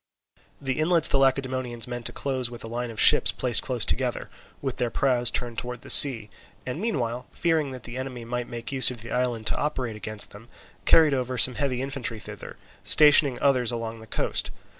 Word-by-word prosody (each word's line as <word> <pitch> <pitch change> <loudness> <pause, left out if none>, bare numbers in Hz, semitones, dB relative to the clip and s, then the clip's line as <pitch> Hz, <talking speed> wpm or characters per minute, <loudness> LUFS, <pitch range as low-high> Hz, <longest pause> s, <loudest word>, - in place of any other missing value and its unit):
The 135 +1 -4
inlets 165 0 +3
the 135 - +1
Lacedaemonians 130 -3 -1
meant 120 -1 -5
to - - -3
close 130 -3 -3
with 120 -1 -11
a - - -7
line 120 +1 -5
of 110 -2 -9
ships - - +6
placed 125 -3 +1
close 125 -7 -3
together, - - -2 0.3
with 135 -3 -5
their 120 - -1
prows 120 -1 0
turned 120 -3 -4
towards 125 0 -8
the - - 0
sea, 115 -7 +7 0.3
and, 130 +7 -6
meanwhile, 125 - -3
fearing 160 -4 -1
that 130 -3 -10
the 120 +1 -9
enemy 130 -3 -7
might 120 0 -5
make 115 +2 -7
use 135 -1 +3
of 125 -3 -8
the 115 - -10
island 120 -3 -2
to - - 0
operate 130 -6 -3
against 105 0 -4
them, 110 +4 -15 0.4
carried 155 -3 +5
over 130 -1 -3
some 130 - +5
heavy 130 -1 -3
infantry 135 -4 -4
thither, - - -11 0.3
stationing 145 -4 +6
others 125 -4 +2
along 115 -1 -6
the 110 - -14
coast. - - 0
125 Hz, 200 wpm, -24 LUFS, 120-135 Hz, 0.4 s, sea